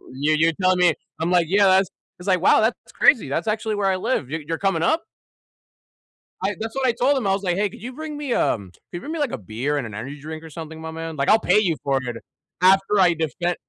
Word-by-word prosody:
You 150 +3 +1
you're 160 +2 +3
telling 185 0 +3
me 180 -1 +5 0.3
I'm 170 - 0
like, 175 -2 +4
yeah, 200 +1 +4
that's 190 0 +4 0.3
it's 180 - -10
like, 185 -3 +2
"Wow, - - +5
that's 220 +2 -1
crazy, 225 - +4
that's 160 +7 -2
actually 215 0 -1
where 205 -1 0
I 190 - +2
live, 185 - -1
you 160 +1 -4
you're 165 - -2
coming 195 -4 0
up?" 320 - +2 1.4
I 200 +2 0
that's 225 0 -5
what 270 -1 +1
I - - +4
told 265 +4 +1
him, 225 - -1
I 195 - +3
was 195 +1 -2
like, 180 -2 0
"Hey, 205 0 +1
could - - -13
you 250 +4 -7
bring 305 +1 -6
me 285 -4 -2
um 100 - 0
could - - -26
you 175 - -4
bring 300 - -7
me 330 - -3
like 290 -5 0
a - - -3
beer 120 +8 -3
and 135 - -2
an 110 - -8
energy 130 +8 -7
drink 155 +2 -8
or 160 - -10
something, 160 0 -8
my 160 0 -6
man? 165 0 -6
Like, 140 -1 0
I'll 220 - +6
pay 210 - +3
you 180 -6 +1
for 135 -1 +1
it 120 -2 -5 0.4
after 195 +2 +4
I 180 -2 +5
defend 165 +2 -2
180 Hz, 265 wpm, -22 LUFS, 155-210 Hz, 1.4 s, I'll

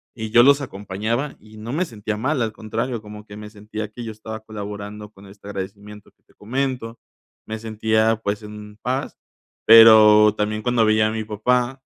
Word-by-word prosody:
y 110 -2 -6
yo 120 - +7
los 140 +1 +5
acompañaba 110 +5 -4
y 110 +1 -16
no 110 +3 -7
me 175 +5 0
sentía 110 - -5
mal, 130 +4 -1
al 115 -1 -1
contrario, 115 +2 -4
como 105 0 -11
que 105 0 -11
me 105 0 -9
sentía 105 0 -7
que 120 +2 -8
yo 115 - -6
estaba 110 +1 -8
colaborando 105 -1 -8
con 100 -1 -16
este 100 +1 -15
agradecimiento 100 +1 -8
que - - -48
te - - -29
comento. 125 0 -4 0.5
Me 110 0 -6
sentía, 110 0 +1
pues, 100 +1 -2
en 105 0 -11
paz, 130 +2 -3 0.5
pero 110 -2 +8
también 105 0 -2
cuando 120 -1 +2
veía 110 0 +3
a 110 - -2
mi 110 0 -3
papá, 125 +5 -1
110 Hz, 185 wpm, -21 LUFS, 105-115 Hz, 0.5 s, pero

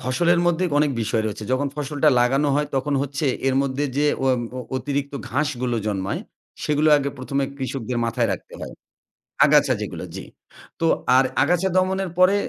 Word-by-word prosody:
ফসলের 170 +7 +2
মধ্যে 175 +1 +2
অনেক 150 0 +3
বিষয় 110 +1 0
রয়েছে। 105 0 -5
যখন 140 +2 +1
ফসলটা 150 +1 0
লাগানো 135 +4 +2
হয় 150 +1 +1
তখন 140 +2 0
হচ্ছে 145 +2 -2 0.2
এর 130 - +1
মধ্যে 140 +1 -1
যে 150 - +2 0.2
অ - - +2 0.3
অ - - -3 0.2
অতিরিক্ত 140 +2 -3 0.2
ঘাসগুলো 130 -3 -1
জন্মায়। 95 -2 -2 0.4
সেগুলো 150 +1 +2
আগে 140 -1 -1
১ম 130 +2 -5
এ - - -4
কৃষকদের 130 -2 -3
মাথায় 115 0 0
রাখতে - - -8
হয়। - - -7 0.7
আগাছা - - +4
যেগুলো, - - -5
জি। - - -6 0.6
তো 165 - +2 0.3
আর 130 - +5 0.2
আগাছা 180 +2 +2
দমনের 185 0 +1
পরে 185 +2 +6
140 Hz, 170 wpm, -22 LUFS, 130-150 Hz, 0.7 s, পরে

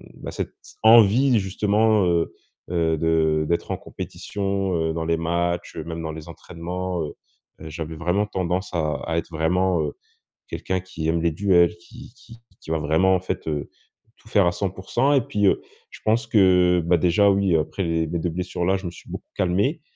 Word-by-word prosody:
Bah - - -7
cette, - - -5 0.3
envie 115 +3 +6
justement, 105 +2 +2
heu 85 -1 +1 0.4
heu, 80 -2 +1
de 80 -1 +2
d'être 85 - -1
en - - -1
compétition, 100 -2 -4
heu, 80 -1 0
dans 80 0 -3
les 85 0 +1
matchs, 85 +1 -2
même 80 +1 -5
dans 80 -1 -4
les 80 +1 -9
entraînements, 90 +1 -5
heu 75 - -6 0.5
heu, 80 - -8
j'avais 80 0 -6
vraiment 90 +5 0
tendance 95 -1 -2
à 75 -3 0
à 80 - -1
être 85 - -3
vraiment, 85 +2 +1
heu, 75 -1 -2 0.6
quelqu'un 95 -1 -2
qui 90 -3 -5
aime 80 0 +1
les 85 - +2
duels, 85 -1 +3
qui 85 - -14
qui 115 - -15 0.2
qui 80 - -8
va 80 - +1
vraiment 80 +6 +3
en 90 - -1
fait, 95 - -4
heu, 75 -2 -3 0.5
tout - - -22
faire 100 -4 +4
à - - +3
100%. 95 +9 0
Et 135 - +4
puis, 105 -2 -1
heu, - - +2 0.3
je - - -13
pense 115 +1 +2
que, 90 -5 +4
bah 85 0 +4
déjà, 90 +5 +4
oui 95 -3 +2
après 80 +5 -1 0.2
mes 85 +2 -2
2 85 - -1
blessures 90 +1 -3
là, 95 +2 +3
je 95 - -9
me 85 - -3
suis 85 - -15
beaucoup - - -8
calmé. 100 - 0
90 Hz, 190 wpm, -23 LUFS, 80-95 Hz, 0.6 s, envie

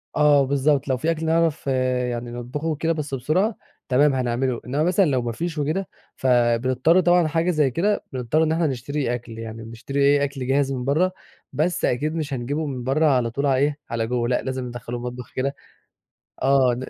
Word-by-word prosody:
آه، 145 -2 +5
بالضبط، 140 +1 +1
لو 130 -1 +1
في 160 +6 0
أكل 160 0 -3
نعرف 165 -3 +1
يعني 125 -2 -1
نطبخه 125 +6 -5
وكده 160 +1 0
بس 150 -3 -5
بسرعة 170 - +1 0.3
تمام 140 +2 +4
هنعمله، 125 0 -1
إنما 140 +5 0
مثلًا 185 +2 +3
لو 130 -4 +1
ما 120 -1 -2
فيش 165 +5 -4
وكده؛ 160 +7 -1 0.3
فبنضطر 130 +6 +3
طبعًا 175 -2 +4
حاجة 165 +3 +1
زي 150 -5 +2
كده 205 - 0
بنضطر 130 +5 +1
إن 160 - +1
إحنا 165 -1 +1
نشتري 135 0 -2
أكل 115 -2 -7
يعني، 115 0 -7
بنشتري 115 +5 -5
إيه 145 0 +4
أكل 135 -2 -3
جاهز 135 0 +2
من 125 -2 -3
برّه، 170 +7 +2 0.4
بس 160 +6 0
أكيد 150 +6 0
مش 150 -3 -3
هنجيبه 140 +5 -2
من 130 -4 -4
برّه 145 +5 +2
على 125 -5 +2
طول 140 +4 -2
على 135 -2 +3
إيه 145 +1 +1
على 115 -1 -1
جوّه، 120 -1 0
لأ 125 - +1
لازم 130 -1 -4
ندخله 120 0 -6
المطبخ 125 0 -7
كده. 140 +2 -1 0.9
آه، 130 -2 +4
135 Hz, 190 wpm, -23 LUFS, 125-155 Hz, 0.9 s, آه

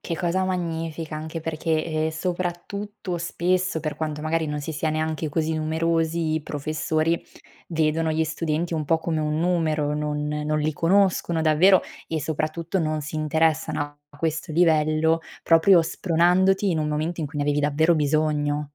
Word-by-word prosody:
Che 165 - -4
cosa 180 +2 0
magnifica, 165 -3 -3
anche 160 +1 -5
perché, 160 0 -1
ehm, 155 -1 -1
soprattutto 180 +3 -4
spesso, 175 0 0
per 155 -1 -4
quanto 155 -1 -3
magari 160 0 0
non 150 0 -3
si 150 +3 -5
sia 155 +1 -1
neanche 155 0 -2
così 160 +1 0
numerosi, 160 +1 0
i 160 - -1
professori 155 +3 -1 0.5
vedono 160 0 +1
gli 160 0 +1
studenti 160 +1 -2
un 155 -1 -1
po' 165 - +3
come 160 -1 -2
un 150 0 -1
numero, 155 -4 +1
non 150 0 -2
non 150 0 -1
li 155 +1 0
conoscono 175 0 +2
davvero 170 +5 +5 0.3
e, 160 - -1
soprattutto, 160 +4 -2
non 155 -2 -1
si 150 +2 -5
interessano 155 0 +1 0.3
a 145 - -18
questo 160 +1 -2
livello 160 -1 +3 0.2
proprio 165 +2 +6
spronandoti 185 +4 +2
in 165 - 0
un 155 -1 0
momento 155 +3 -2
in 155 - -1
cui 145 +1 -9
ne 145 - 0
avevi 145 0 +1
davvero 150 +3 +3
bisogno. 150 -1 +1
160 Hz, 165 wpm, -24 LUFS, 155-170 Hz, 0.5 s, proprio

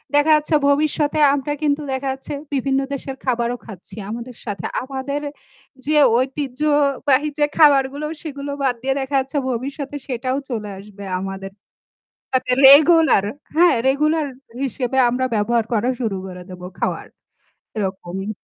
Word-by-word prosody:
দেখা 290 +2 +4
যাচ্ছে 305 +1 +1
ভবিষ্যতে 295 +1 +1
আমরা 285 +1 -1
কিন্তু 295 0 +1
দেখা 265 +1 -3
যাচ্ছে 270 +2 -5 0.2
বিভিন্ন 270 0 +1
দেশের 270 -1 -5
খাবারও 240 -1 0
খাচ্ছি 195 -5 -8
আমাদের 235 +2 -6
সাথে, 200 -6 -5 0.2
আমাদের 275 +2 -4 0.6
যে 305 +1 +2 0.2
ঐতিহ্যবাহী 280 +1 +1
যে 295 - +5
খাবারগুলো 285 -1 +4 0.2
সেগুলো 285 -2 -6
বাদ 260 -3 +1
দিয়ে 270 +1 0
দেখা 270 +1 -3
যাচ্ছে 270 +2 -3
ভবিষ্যতে 275 +4 -4
সেটাও 255 0 -2
চলে 215 -4 -4
আসবে 200 0 -12 0.2
আমাদের 195 0 -6 0.8
তাতে 255 -1 +1
রেগুলার 310 - +7 0.3
হ্যাঁ 340 -1 +5
রেগুলার 305 +3 +2 0.4
হিসেবে 260 -1 -2
আমরা 255 +2 0
ব্যবহার 225 +2 +1
করা 230 +2 +1
শুরু 220 -5 -1
করে 180 -1 -8
দেব 180 -1 -10 0.2
খাওয়ার - - -2 0.7
এরকমই। 190 -1 -4
265 Hz, 135 wpm, -20 LUFS, 235-290 Hz, 0.8 s, রেগুলার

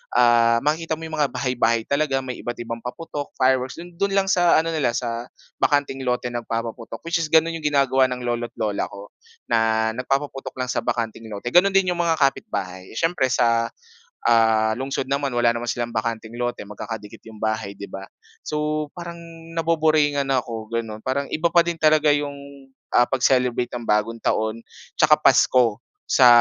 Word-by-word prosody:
ah, 115 -1 +4
makikita 160 +2 0
mo 160 - -11
'yung 160 - -7
mga 145 - +3
bahay-bahay 115 -4 0
talaga 140 0 0
may 130 -1 -6
iba't 120 - -4
ibang 115 0 -5
paputok, 145 +4 -6
fireworks. 130 0 +1
Do'n 175 0 -11
do'n 200 0 +1
lang 195 -1 +2
sa 175 -1 +4
ano 165 +1 +2
nila 140 -7 0
sa 120 -1 -3 0.3
bakanteng 145 -2 +1
lote 125 0 -1
nagpapaputok, 115 0 -5
which 170 +1 0
is 165 - -1
gano'n 160 +1 +4
'yung 155 - -1
ginagawa 135 -2 +3
ng 125 -1 -5
lolo't 120 0 -3
lola 105 -2 -1
ko. 100 +1 -11 0.4
Na 110 0 +2
nagpapaputok 135 +2 -3
lang 125 -1 -2
sa - - 0
bakanteng 115 -1 -3
lote. 110 +3 -5
Gano'n 195 +5 +4
din 190 -2 +4
'yung 175 - -3
mga 170 -1 +2
kapitbahay. 100 -10 -2
Siyempre 165 -1 +1
sa, 115 -2 +2 0.6
ah, 110 -1 +4
lungsod 135 0 -3
naman 140 -2 -1
wala 120 -1 +3
naman 120 0 -3
silang 120 0 -2
bakanteng 115 0 -4
lote. 120 0 -2
Magkakadikit 105 +1 -8
'yong 110 -1 -12
bahay, 110 -2 -2
'di 100 0 -9
ba? 95 0 -7 0.4
So 150 0 -1
parang 170 -1 -7 0.4
naboboringan 155 -4 +2
ako 115 -4 -2
gano'n. 115 -2 -4
Parang 140 +2 -1
iba 170 +2 +1
pa 170 0 +4
din 170 - 0
talaga 155 0 +4
'yong 140 -1 -6 0.2
ah, 120 - +5
pag-celebrate 125 -2 +1
ng 120 -2 -5
Bagong 105 +2 +1
Taon, 110 +1 0 0.4
tsaka - - +6
Pasko 120 -4 +4 0.3
sa 130 - +6
125 Hz, 175 wpm, -23 LUFS, 115-150 Hz, 0.6 s, tsaka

